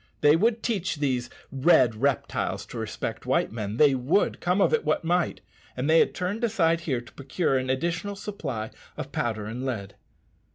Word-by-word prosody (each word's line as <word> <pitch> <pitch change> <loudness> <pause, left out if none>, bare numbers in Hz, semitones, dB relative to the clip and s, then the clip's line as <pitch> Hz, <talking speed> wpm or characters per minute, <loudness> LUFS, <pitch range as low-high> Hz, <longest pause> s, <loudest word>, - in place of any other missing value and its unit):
They 145 +1 +6
would 225 +6 +1
teach 190 -8 -1
these 130 -5 -1 0.2
"red 130 -3 +4
reptiles" 135 +4 -1
to - - -6
respect - - -5
white - - +1
men, 105 -1 -4
they 145 -1 +6
would, 135 +11 +1
come 180 +3 +1
of - - +3
it 465 - +2
what - - 0
might; 175 +1 0 0.4
and 130 +3 -1
they 160 +1 +6
had - - +2
turned 195 +6 -2
aside 170 -8 +2
here 140 -7 -2
to 120 - -16
procure 140 +2 -1
an 130 0 -1
additional 170 +9 -1
supply 140 - -5 0.3
of - - -6
powder 110 -3 -2
and 115 +4 -5
lead. 105 -7 -4
145 Hz, 180 wpm, -26 LUFS, 125-180 Hz, 0.4 s, They